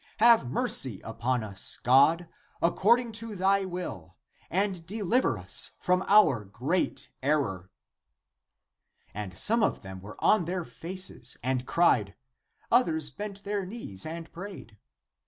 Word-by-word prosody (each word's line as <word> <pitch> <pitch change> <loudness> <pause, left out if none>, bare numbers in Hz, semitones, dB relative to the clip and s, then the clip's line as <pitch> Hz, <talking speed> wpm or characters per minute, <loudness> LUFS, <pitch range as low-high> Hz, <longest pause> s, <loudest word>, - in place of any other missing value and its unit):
Have 225 - +5
mercy 130 - 0
upon 115 +2 -2
us, 100 -3 0
God, 145 +7 +4 0.3
according 230 +8 +3
to 225 -2 -7
thy 195 +1 +2
will, 175 - -6 0.3
and 190 -1 -1
deliver 215 - +1
us 90 0 +1
from 180 +1 +1
our 195 - +5
great 125 - -2
error." 130 -11 -1 1.4
And 100 -3 -6
some 230 +2 +3
of - - 0
them 95 -1 -9
were 105 +2 -10
on 210 -5 +3
their 180 0 -3
faces 180 -8 -4
and 130 0 -1
cried; 115 - +2 0.6
others 160 - +2
bent 205 -1 -7
their 205 -1 -2
knees 185 - -7
and 165 +1 -7
prayed. 180 - -9
170 Hz, 125 wpm, -28 LUFS, 120-200 Hz, 1.4 s, Have